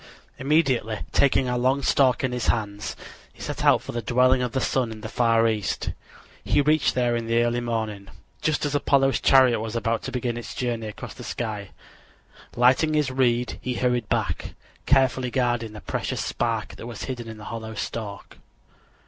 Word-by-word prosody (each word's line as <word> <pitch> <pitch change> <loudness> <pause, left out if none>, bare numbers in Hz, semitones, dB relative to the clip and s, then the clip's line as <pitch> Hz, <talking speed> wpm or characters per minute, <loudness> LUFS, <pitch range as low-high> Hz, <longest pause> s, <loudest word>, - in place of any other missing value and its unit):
Immediately, 135 -7 +1
taking 135 -2 +3
a 125 0 0
long 130 +3 +2
stalk 130 -3 +3
in 130 - +1
his 125 -2 -2
hands, 105 -3 -1 0.4
he - - -24
set - - -4
out - - +4
for - - -6
the 120 - -3
dwelling 125 +3 +3
of 125 -1 -1
the 135 - +1
sun 125 -2 0
in 110 -1 -8
the 110 - -5
far 115 0 +3
east. 110 -3 -1 0.5
He - - +2
reached 150 +1 +3
there 120 -1 +2
in 115 -1 -3
the 115 +1 +3
early 120 0 +1
morning, 110 -4 -3 0.3
just 155 -1 0
as 145 - -1
Apollo's 135 -1 +2
chariot 130 -4 +5
was 110 +1 -5
about 115 0 0
to - - -5
begin 120 -2 -2
its 120 - -7
journey 120 -3 -2
across 105 - -8
the - - -10
sky. 105 -4 -4 0.9
Lighting 130 +6 +4
his 150 -3 +1
reed, 125 -2 +1
he 125 -1 -3
hurried 125 -3 0
back, - - -2 0.3
carefully 130 -2 +3
guarding 120 -3 0
the 105 - -9
precious - - -3
spark 115 -2 -2
that 115 - -8
was 120 -2 -7
hidden 120 -3 -5
in 110 -1 -8
the 105 - -10
hollow 110 -1 -6
stalk. 105 -1 -6
120 Hz, 185 wpm, -25 LUFS, 115-130 Hz, 0.9 s, chariot